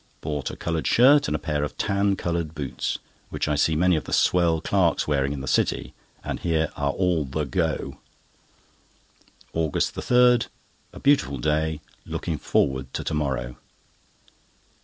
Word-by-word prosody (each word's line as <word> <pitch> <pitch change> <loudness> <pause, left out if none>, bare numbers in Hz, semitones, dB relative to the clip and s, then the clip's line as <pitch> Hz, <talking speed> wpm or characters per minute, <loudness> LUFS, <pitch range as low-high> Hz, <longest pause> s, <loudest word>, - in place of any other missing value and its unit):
Bought 75 -3 -3
a - - -7
coloured 80 -2 -2
shirt 140 +4 +5
and 75 - -1
a - - +1
pair 75 -2 -2
of 75 - -5
tan 100 0 +1
coloured 85 -3 -3
boots, 70 -4 -3 0.3
which - - -2
I 75 - +1
see 80 +2 +2
many 90 +2 +3
of 80 - -2
the - - -5
swell 85 -2 +3
clerks 90 -1 +1
wearing 70 -2 +1
in 70 -2 -4
the 70 - -6
City, - - 0 0.3
and - - -4
hear 80 -2 0
are 70 -1 -1
all 90 0 +1
the 75 +3 -3
"go." 65 - -2 1.5
AUGUST 80 -3 0
3.—A 125 -1 +1
beautiful 135 - +3
day. 75 +3 0 0.3
Looking - - -3
forward 65 0 0
to - - -2
to - - -3
morrow. 65 -5 -2
80 Hz, 155 wpm, -24 LUFS, 70-90 Hz, 1.5 s, shirt